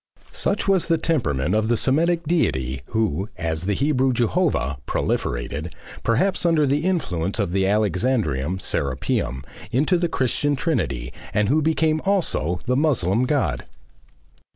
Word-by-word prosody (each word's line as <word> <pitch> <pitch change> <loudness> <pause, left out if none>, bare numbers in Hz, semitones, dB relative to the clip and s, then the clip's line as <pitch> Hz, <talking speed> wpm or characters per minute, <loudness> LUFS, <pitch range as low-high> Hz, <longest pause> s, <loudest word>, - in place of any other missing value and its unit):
Such 200 - 0
was 195 -3 +2
the 165 -1 +3
temperament 85 - 0
of 110 0 +2
the 120 0 +2
Semitic 165 +7 +2
deity 65 - 0
who, 105 -3 -1
as 80 0 -3
the 100 +1 0
Hebrew 135 -1 +2
Jehovah, 120 - 0
proliferated, 70 +7 -2 0.3
perhaps 180 +14 +1
under 165 -3 +3
the 145 +4 0
influence 95 - -1
of 100 -6 -1
the 95 +1 +1
Alexandrian 95 - 0
Serapeum, 65 -5 -2 0.3
into 155 +8 +2
the 175 -1 0
Christian 145 +1 0
Trinity 95 - -2 0.2
and 105 0 +2
who 155 +4 +3
became 155 0 +1
also 160 - 0
the 125 - +1
Moslem 125 - +2
God. 145 0 0
115 Hz, 135 wpm, -23 LUFS, -, 0.3 s, the